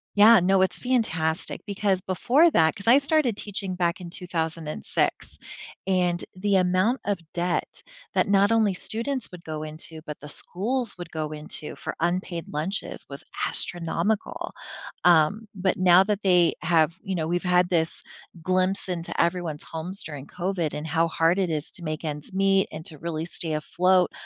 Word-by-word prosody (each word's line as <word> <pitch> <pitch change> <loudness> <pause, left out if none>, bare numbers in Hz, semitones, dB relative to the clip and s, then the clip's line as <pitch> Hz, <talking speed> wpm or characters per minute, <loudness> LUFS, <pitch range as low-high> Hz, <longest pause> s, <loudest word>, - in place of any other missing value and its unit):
Yeah, 215 +1 +8
no, 190 +1 +3
it's 190 - +1
fantastic, 180 -11 0
because 200 -2 0
before 255 - +3
that 160 - +3
'cause 200 +2 -7
I 245 - +8
started 280 -7 +1
teaching 195 -2 -4
back 175 0 0
in 175 - -7
2006, 165 -3 -2 0.5
and 180 -2 +1
the 195 +1 +2
amount 185 +7 +2
of 205 -1 0 0.2
debt 175 0 -2 0.3
that - - +2
not 200 +1 +4
only 220 -3 +3
students 230 +5 -3
would 180 - -10
go 155 -1 -4
into, 155 +1 -8
but 150 -1 -7
the 150 - -10
schools 225 - -2
would 175 -2 -7
go 155 -1 -3
into 150 0 -6
for - - -5
unpaid 175 -1 -1
lunches 160 +7 -3
was 140 0 -8 0.2
astronomical, 175 +5 -2 0.5
um, 175 +6 +4
but 185 0 0
now 185 0 +6
that 205 0 -1
they 180 -3 +4
have, 165 -1 +3
you 195 -3 -3
know 160 -3 -1
we've 175 +1 0
had 180 0 +3
this 165 -2 0 0.4
glimpse 185 +3 0
into 175 -2 -3
everyone's 170 -3 -1
homes 175 +4 -6
during 145 -3 -8
COVID 180 -3 -2
and 150 - -4
how 165 +1 +2
hard 165 +3 +2
it 185 -3 +1
is 155 -1 -1
to 175 - -4
make 155 +1 -4
ends 150 +3 -5
meet 195 0 +3
and 155 - -6
to 155 - -9
really 160 +1 -3
stay 165 -2 0
afloat, 180 +4 +2
180 Hz, 170 wpm, -25 LUFS, 160-195 Hz, 0.5 s, Yeah